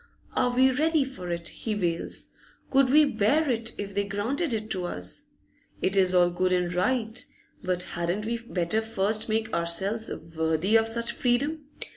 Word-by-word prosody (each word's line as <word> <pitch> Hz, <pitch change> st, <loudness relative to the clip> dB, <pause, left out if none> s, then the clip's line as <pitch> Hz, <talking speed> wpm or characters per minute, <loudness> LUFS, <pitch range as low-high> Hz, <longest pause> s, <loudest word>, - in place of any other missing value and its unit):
Are 245 Hz, -, +2 dB
we 260 Hz, +1 st, +5 dB
ready 310 Hz, +2 st, +2 dB
for 225 Hz, -10 st, -7 dB
it? 170 Hz, 0 st, -3 dB
he 220 Hz, -2 st, -4 dB
wails. 170 Hz, -4 st, -2 dB, 0.4 s
Could 270 Hz, -1 st, +4 dB
we 300 Hz, +3 st, +6 dB
bear 280 Hz, +5 st, +2 dB
it, 230 Hz, -1 st, -2 dB
if 200 Hz, -1 st, -5 dB
they 200 Hz, +1 st, +1 dB
granted 230 Hz, -, -2 dB
it 215 Hz, -1 st, -3 dB
to 185 Hz, -2 st, +1 dB
us? 90 Hz, -, -2 dB, 0.5 s
It 190 Hz, -, 0 dB
is 185 Hz, -2 st, +4 dB
all 175 Hz, -1 st, +5 dB
good 185 Hz, +1 st, 0 dB
and 180 Hz, -1 st, +1 dB
right, 225 Hz, +4 st, 0 dB, 0.4 s
but 180 Hz, -1 st, -1 dB
hadn't 175 Hz, +5 st, -3 dB
we 235 Hz, +1 st, -2 dB
better 215 Hz, -2 st, -1 dB
first 220 Hz, 0 st, +1 dB
make 220 Hz, 0 st, -1 dB
ourselves 190 Hz, +7 st, +1 dB, 0.3 s
worthy 160 Hz, +6 st, +1 dB
of 225 Hz, 0 st, +5 dB
such 235 Hz, +1 st, 0 dB
freedom? 285 Hz, +5 st, 0 dB
215 Hz, 170 wpm, -27 LUFS, 180-245 Hz, 0.5 s, we